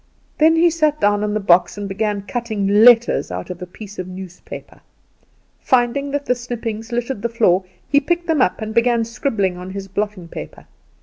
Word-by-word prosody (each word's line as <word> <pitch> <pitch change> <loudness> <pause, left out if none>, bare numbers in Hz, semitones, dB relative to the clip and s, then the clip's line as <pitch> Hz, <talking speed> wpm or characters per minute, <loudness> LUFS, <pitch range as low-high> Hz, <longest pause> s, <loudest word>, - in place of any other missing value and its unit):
Then 320 +1 +5
he 335 +1 +4
sat 305 -2 +1
down 205 0 +2
on 210 0 -1
the - - +1
box, 180 -2 +3
and 205 -1 -4
began 205 0 -2
cutting 220 -2 -3
letters 225 +3 +5
out 90 - -5
of 180 0 -8
a 180 - -6
piece 205 +2 -11
of 185 - -4
newspaper. 185 -1 -10 0.8
Finding 255 +3 +1
that 285 0 -2
the - - +2
snippings 235 -2 -5
littered 240 -1 -2
the 235 - -1
floor, 195 -5 +2 0.2
he 285 - +4
picked 345 +4 -1
them 320 -5 +1
up - - +1
and 220 0 -5
began 235 0 +2
scribbling 220 -6 -1
on 180 +1 -8
his 195 0 -6
blotting 200 -2 -3
paper. - - -9
220 Hz, 190 wpm, -20 LUFS, 195-245 Hz, 0.8 s, Then